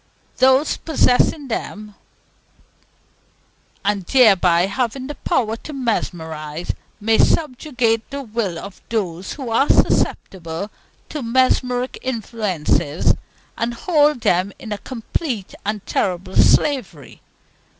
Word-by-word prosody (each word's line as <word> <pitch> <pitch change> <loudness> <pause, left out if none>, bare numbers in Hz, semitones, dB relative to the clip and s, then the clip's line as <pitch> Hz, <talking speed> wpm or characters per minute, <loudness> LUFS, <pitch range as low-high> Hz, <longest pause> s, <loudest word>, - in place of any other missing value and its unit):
Those 265 +3 +4
possessing 285 -1 +2
them, 210 -3 -5 1.9
and 205 -1 +1
thereby 185 -6 +4
having 250 +5 -2
the 295 - -5
power 225 -5 0
to 300 - -9
mesmerize, 160 - -3 0.3
may 220 +1 +2
subjugate 250 -6 +1
the 280 0 -5
will 215 -7 -2
of 200 +2 -9
those 190 -5 -2
who 260 -5 -6
are 270 +5 +3
susceptible 170 +2 +1 0.4
to 300 - -4
mesmeric 250 +1 +1
influences, 210 - 0 0.4
and 235 +1 -2
hold 295 -3 +2
them 185 +1 +2
in 220 - -9
a 205 - -3
complete 235 - -4
and 210 -1 -3
terrible 185 0 -2
slavery. 195 - +2
225 Hz, 105 wpm, -20 LUFS, 190-260 Hz, 1.9 s, Those